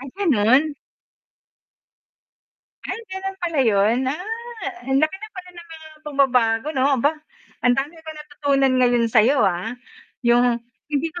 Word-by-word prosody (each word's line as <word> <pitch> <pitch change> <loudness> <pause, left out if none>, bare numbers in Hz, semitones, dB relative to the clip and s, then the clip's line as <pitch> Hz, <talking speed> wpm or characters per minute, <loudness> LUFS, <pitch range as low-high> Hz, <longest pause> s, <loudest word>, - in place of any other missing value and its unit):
Ay, 270 - -8
gano'n? 285 - +3 2.1
Ay, - - -4
gano'n 380 0 -5
pala 335 -4 -2
yun? 215 +2 +3
Ah. 280 +7 -2 0.6
Ang 270 +1 +1
laki 310 +4 +1
na 435 +2 -9
pala 365 -1 -8
ng 345 -1 -12
mga 320 -1 -11 0.2
pagbabago 255 -3 +2
'no? 260 0 +1
Aba, 285 +5 +3 0.5
ang 250 0 +5
dami 285 +4 -2
ko 320 - -8
natutunan 285 -3 0
ngayon 240 -1 +3
sayo, 235 +4 +4
ah. 190 +4 -1 0.5
Yung 240 0 +4 0.3
hindi 295 +3 0
ko 350 - -7
275 Hz, 140 wpm, -22 LUFS, 240-315 Hz, 2.1 s, ang